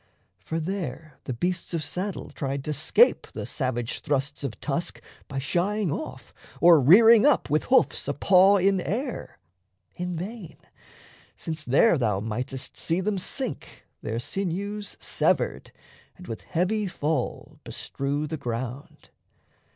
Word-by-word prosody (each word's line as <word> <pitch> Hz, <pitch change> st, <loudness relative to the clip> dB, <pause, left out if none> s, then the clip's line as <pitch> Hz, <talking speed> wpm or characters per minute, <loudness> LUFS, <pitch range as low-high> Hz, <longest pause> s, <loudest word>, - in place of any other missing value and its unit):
For 160 Hz, -, -4 dB
there 160 Hz, -4 st, -5 dB
the 130 Hz, -, -3 dB
beasts 175 Hz, +5 st, -2 dB
of 160 Hz, -, -1 dB
saddle 180 Hz, +7 st, -4 dB
tried 135 Hz, -1 st, -3 dB
to 150 Hz, -, -2 dB
scape 155 Hz, -, +3 dB
The -, -, -5 dB
savage 120 Hz, -4 st, -2 dB
thrusts 145 Hz, -2 st, -1 dB
of 115 Hz, -7 st, -4 dB
tusk -, -, -2 dB, 0.3 s
by 135 Hz, -, -6 dB
shying 180 Hz, +7 st, 0 dB
off, 310 Hz, -, -6 dB, 0.3 s
Or 170 Hz, -3 st, +7 dB
rearing 220 Hz, -, +8 dB
up 295 Hz, -, +3 dB
with 155 Hz, -, +2 dB
hoofs 260 Hz, -, +2 dB
a 145 Hz, -, -1 dB
paw 190 Hz, +6 st, +5 dB
in 195 Hz, 0 st, +2 dB
air. 240 Hz, +7 st, -4 dB, 0.6 s
In 180 Hz, 0 st, -3 dB
vain 195 Hz, 0 st, -7 dB, 0.8 s
since 160 Hz, -1 st, -5 dB
there 145 Hz, -, +4 dB
thou 105 Hz, -6 st, +1 dB
mightest 125 Hz, +5 st, -4 dB
see 165 Hz, +2 st, 0 dB
them 195 Hz, +1 st, -1 dB
sink, 255 Hz, +7 st, -5 dB, 0.2 s
Their 110 Hz, -, -3 dB
sinews 195 Hz, -, -3 dB
severed, -, -, 0 dB, 0.5 s
and 180 Hz, -, -12 dB
with 110 Hz, -, -6 dB
heavy 195 Hz, +5 st, 0 dB
fall 150 Hz, -6 st, -3 dB
Bestrew 140 Hz, +2 st, -3 dB
the 155 Hz, +1 st, -4 dB
ground. 125 Hz, +2 st, -6 dB
165 Hz, 135 wpm, -26 LUFS, 135-195 Hz, 0.8 s, rearing